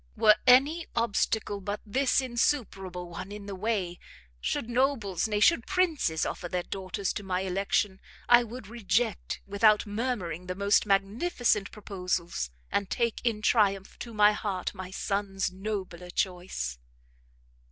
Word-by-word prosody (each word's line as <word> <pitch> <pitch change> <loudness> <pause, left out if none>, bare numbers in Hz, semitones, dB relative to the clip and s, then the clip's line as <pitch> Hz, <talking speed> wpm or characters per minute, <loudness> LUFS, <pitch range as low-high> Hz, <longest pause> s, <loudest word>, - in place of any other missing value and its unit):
Were 215 -1 +6
any 285 +7 +5
obstacle 215 -2 0
but 205 +2 -3
this 265 +5 +2
insuperable 200 -8 -1
one 180 +3 -7
in 205 -1 -8
the 200 - -6
way, 190 -3 -2 0.4
should 65 - -2
nobles, 235 -7 +1
nay, 210 -1 0
should 235 +2 +4
princes 325 - +1
offer 175 - -4
their 180 0 -1
daughters 190 0 -3
to - - -4
my 185 -1 -1
election, 190 +1 0 0.3
I 240 0 +7
would 235 0 -8
reject 220 0 -1
without 210 +2 +4
murmuring 205 -6 -3
the 185 - -3
most 200 +2 +3
magnificent 205 - +1
proposals, 180 - -3 0.2
and 200 -1 0
take 235 -2 0
in 220 -3 0
triumph 200 -4 +2
to 235 - -6
my 210 -1 +5
heart 200 -3 -3
my 185 -1 -7
son's 195 0 -2
nobler 185 -3 -5
choice!" 175 - -2
200 Hz, 140 wpm, -28 LUFS, 185-230 Hz, 0.4 s, I